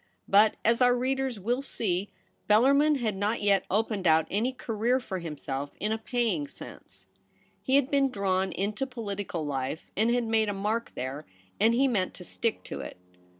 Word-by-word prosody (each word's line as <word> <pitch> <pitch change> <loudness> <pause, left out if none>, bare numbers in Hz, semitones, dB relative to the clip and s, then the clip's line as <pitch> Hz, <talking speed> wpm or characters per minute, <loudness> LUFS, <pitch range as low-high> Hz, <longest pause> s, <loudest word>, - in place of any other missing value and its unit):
But, 210 +2 +5
as 230 +3 +3
our 245 0 +5
readers 260 -2 -1
will 240 +7 0
see, 200 -8 -2 0.4
Bellarmin 280 +8 +5
had 225 -6 -1
not 205 +4 0
yet 200 -2 +3
opened 210 -2 0
out 160 0 +5
any 225 +6 +1
career 240 0 0
for 190 -7 -5
himself 145 -4 -5
in 210 - -1
a 220 - -1
paying 245 +5 -1
sense. - - -10 0.5
He 265 - +1
had 280 -1 +3
been 275 -1 +3
drawn 190 -4 0
into 215 +7 -2
political 200 - -4
life 135 +1 -4
and 220 +4 +2
had 240 0 +2
made 225 -1 +1
a - - -1
mark 215 +4 -2
there, 135 +4 -5 0.3
and 225 +3 +4
he 270 +3 +4
meant 200 -8 0
to 180 - -10
stick 225 +5 -2
to - - -6
it. 70 +3 -7
215 Hz, 180 wpm, -28 LUFS, 190-245 Hz, 0.5 s, But